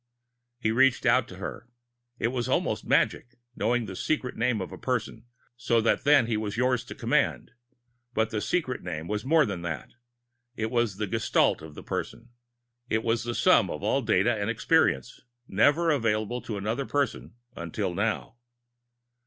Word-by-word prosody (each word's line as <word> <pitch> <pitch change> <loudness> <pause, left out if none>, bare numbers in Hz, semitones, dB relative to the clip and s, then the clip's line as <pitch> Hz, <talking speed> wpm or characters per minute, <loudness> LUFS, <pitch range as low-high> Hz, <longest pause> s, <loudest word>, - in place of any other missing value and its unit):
He 110 -3 0
reached 130 +2 +3
out 120 -1 +3
for 95 - -9
her. 100 +6 -7 0.5
It 115 - 0
was 125 0 -2
almost - - 0
magic 125 0 +1 0.2
knowing 120 +2 0
the 95 -2 -7
"secret 125 +2 -2
name" 115 -1 +1
of 90 -4 -5
a - - -8
person, - - -3 0.3
so 120 -1 +1
that 115 - +1
then 145 -4 +6
he 115 -1 -1
was 105 -1 -3
yours 125 -1 +2
to - - -9
command. - - 0 0.6
But 110 0 +1
the 105 - -2
"secret 140 -5 -1
name" 85 -2 -5
was 105 +2 -2
more 155 +3 +4
than 95 -6 -4
that. 80 -5 -5 0.6
It 110 -1 -2
was 120 -5 0
the 105 - -1
gestalt 95 - +1
of 80 -1 -11
the - - -9
person. 120 - -5 0.6
It 110 0 0
was 115 0 0
the 120 0 -3
sum - - +4
of - - -5
all - - +2
data - - +2
and - - -2
experience, 65 -1 +1 0.3
never 150 - +3
available 115 -2 0
to 105 - -5
another 110 +7 -2
person 140 -5 -2 0.2
until 90 +3 -3
now. 110 +4 -2
115 Hz, 170 wpm, -27 LUFS, 105-125 Hz, 0.6 s, then